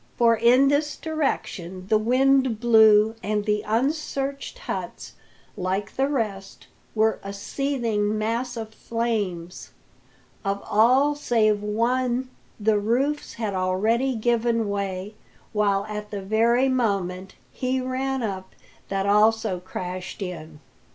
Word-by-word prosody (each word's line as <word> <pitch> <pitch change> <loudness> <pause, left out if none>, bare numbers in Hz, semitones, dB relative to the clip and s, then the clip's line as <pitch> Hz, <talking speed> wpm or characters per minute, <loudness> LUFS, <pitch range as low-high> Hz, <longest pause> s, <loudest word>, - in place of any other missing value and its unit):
For 230 -1 +5
in 245 +5 +5
this 295 +1 +1
direction 190 - -3
the 215 +1 +3
wind 260 0 +3
blew, 220 -2 +6
and 210 +1 -1
the 210 0 +1
unsearched 275 - -2
huts, - - -6 0.4
like 190 +1 -3
the 270 +1 +1
rest, 210 -8 -3 0.3
were 220 0 +2
a 200 - -5
seething 215 -1 -1
mass 235 +3 -2
of 220 -1 -6
flames. 205 -8 -3 0.7
Of 200 0 -1
all 255 +7 +4
save 220 -7 +1
one 245 +4 0 0.3
the 210 0 +2
roofs 265 +8 0
had 220 -3 -3
already 215 +8 +1
given 230 0 +1
way, 200 0 -3 0.4
while 200 -2 +1
at 210 -1 -6
the 200 -2 -5
very 230 +5 +3
moment 195 -7 -1 0.2
he 255 0 -1
ran 260 0 -2
up 190 -3 -5 0.3
that 195 0 -1
also 210 -1 +3
crashed 180 +1 -6
in. 160 -4 -8
220 Hz, 120 wpm, -24 LUFS, 200-255 Hz, 0.7 s, blew